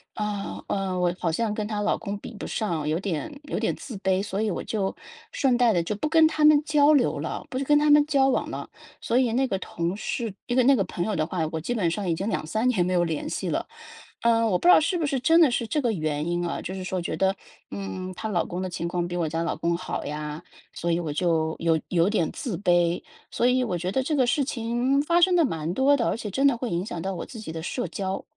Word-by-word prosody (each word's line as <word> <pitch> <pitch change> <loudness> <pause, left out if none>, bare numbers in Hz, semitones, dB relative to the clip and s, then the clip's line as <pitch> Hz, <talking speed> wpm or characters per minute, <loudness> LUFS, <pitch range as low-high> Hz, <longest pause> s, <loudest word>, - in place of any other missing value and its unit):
啊， 210 -1 -4
呃， 190 -2 -1
我 175 0 +1
好 165 - 0
像 215 +4 -1
跟 210 -1 -3
她 210 -1 -3
老 - - +1
公 205 -1 -5
比 - - -9
不 - - -7
上， 165 -9 -2
有 160 +3 0
点 200 - -4
有 - - -3
点 - - 0
自 245 -6 -8
卑， 190 0 +1
所 200 0 -3
以 215 -3 0
我 - - -3
就 195 -3 -2 0.4
顺 255 -3 +2
带 240 -3 +4
的 170 - +2
就 210 +4 -3
不 300 - -2
跟 320 -1 +6
她 310 -1 +1
们 300 -1 +6
交 300 -1 +5
流 155 - +2
了， 155 - -4
不 255 - -4
跟 295 +1 +5
她 300 - +2
们 295 0 +6
交 275 -3 +3
往 - - 0
了。 - - -6 0.3
所 235 - 0
以 250 -3 +3
那 265 +2 +2
个 195 - -1
同 170 +2 -3
事， 230 0 -3 0.2
那 245 - -1
个 255 - +5
那 275 +2 +6
个 195 - +1
朋 175 - -3
友 215 -3 -1
的 155 -1 0
话， 180 -3 -3
我 160 - -2
基 240 - -2
本 190 -8 +1
上 200 0 -3
已 - - +2
经 195 +6 -3
2-3 220 +8 -1
年 185 -8 +2
没 185 - -1
有 175 - +3
联 165 -3 -2
系 - - -3
了。 - - -1 0.6
呃， 230 -1 +3
我 180 -3 +2
不 - - -3
知 - - +10
道 - - +7
是 355 +4 0
不 320 - -1
是 270 -3 -1
真 325 +5 +4
的 300 -6 +6
是 235 -1 -1
这 300 +4 -1
个 235 -2 +1
原 155 -3 -2
因 175 0 -1
啊， - - -4
就 185 - -5
是 190 - -5
说 185 -1 -2
觉 - - -3
得， 190 0 +1 0.3
嗯， 100 - -5
她 220 - -5
老 175 - 0
公 180 +2 -4
的 185 - -3
情 170 0 -3
况 175 0 -1
比 175 - -4
我 165 - 0
家 165 +2 -2
老 170 - -1
公 170 0 0
好 185 - -5
呀， 150 +1 -5 0.3
所 170 - -2
以 165 - +1
我 155 -3 -3
就 160 -1 +1
有 165 -1 +2
有 175 +1 +2
点 175 -7 +1
自 230 - -4
卑。 175 -2 +2 0.3
所 240 - +1
以 255 +1 +3
我 185 -7 -2
觉 180 +2 -3
得 265 - +1
这 300 +2 -1
个 255 -2 +3
事 245 +4 +2
情 250 +2 0
发 340 +3 +2
生 360 0 +5
得 335 - +4
蛮 165 - -2
多 275 +4 +4
的， 235 - 0
而 - - 0
且 210 -3 -5
真 270 +8 +2
的 275 - +4
会 240 0 -4
影 175 +3 -1
响 165 -5 -5
到 195 - -2
我 - - -5
自 230 - -10
己 160 -7 -7
的 160 0 -5
社 245 +8 -3
交。 190 -2 -4
200 Hz, 295 characters per minute, -25 LUFS, 175-255 Hz, 0.6 s, 知